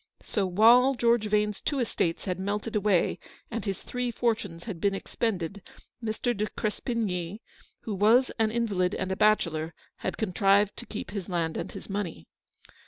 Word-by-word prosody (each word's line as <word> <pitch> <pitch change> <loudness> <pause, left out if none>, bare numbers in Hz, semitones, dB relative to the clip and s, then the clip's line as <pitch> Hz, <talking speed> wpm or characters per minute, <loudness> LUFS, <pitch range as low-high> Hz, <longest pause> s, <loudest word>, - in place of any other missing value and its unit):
So, 200 -3 0
while 235 +8 +6
George 235 -2 +3
Vane's 210 -1 +1
two 285 - -1
estates 205 -9 -1
had 180 -1 -2
melted 205 +3 -2
away, 205 -4 +2 0.3
and 230 -2 -3
his 195 -3 -3
three 250 0 -2
fortunes 220 -8 -1
had 195 -8 -6
been 200 -1 +2
expended, 195 -2 -2 0.4
Mr. 230 +2 -1
de 210 +1 -1
Crespigny, 210 -4 -2 0.4
who 220 - -4
was 220 +7 +4
an 220 -1 +3
invalid 210 -6 0
and 190 0 -2
a - - 0
bachelor, 165 -6 +2 0.2
had - - -3
contrived 200 0 +3
to 240 - -9
keep 210 -4 -6
his 195 -3 -5
land 165 -3 -1
and - - -4
his - - -8
money. 195 - -4
210 Hz, 165 wpm, -28 LUFS, 185-225 Hz, 0.4 s, while